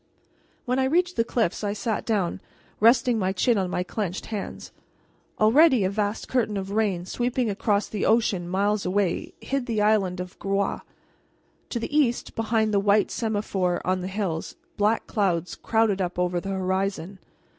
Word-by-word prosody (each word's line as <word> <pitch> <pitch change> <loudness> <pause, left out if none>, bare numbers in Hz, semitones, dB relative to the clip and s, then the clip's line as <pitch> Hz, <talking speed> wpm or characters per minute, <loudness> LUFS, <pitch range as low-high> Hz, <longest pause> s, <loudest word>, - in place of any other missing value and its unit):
When 250 +1 0
I 260 - +2
reached 355 +6 +1
the 230 - +2
cliffs 225 -5 -1
I 205 -1 0
sat 210 +1 -3
down, 200 -6 0 0.4
resting 235 +1 +4
my 190 -1 +1
chin 230 +5 +2
on 185 -2 -1
my 180 - -1
clenched 190 -1 -4
hands. 210 -3 -6 0.7
Already 255 +2 +5
a 190 - +1
vast 205 +1 -2
curtain 225 -5 0
of 195 0 -4
rain, 200 -5 0
sweeping 245 +2 -1
across 205 +1 0
the 210 - -4
ocean 200 -6 +2
miles 200 +2 +1
away, 185 -1 -1
hid 275 -2 -2
the 225 -3 -1
island 195 -4 +2
of 180 0 -7
Groix. 195 0 -1 0.9
To 240 - -2
the 260 +6 -4
east, 255 -6 +1
behind 220 -1 0
the 200 - +4
white 205 +1 +3
semaphore 205 -5 -1
on 185 0 0
the 180 - -4
hills, 190 -5 -3 0.2
black 210 +2 +1
clouds 180 -5 0
crowded 220 -3 +1
up 180 -1 -3
over 180 0 0
the 195 - -6
horizon. 190 0 -2
205 Hz, 165 wpm, -25 LUFS, 190-225 Hz, 0.9 s, Already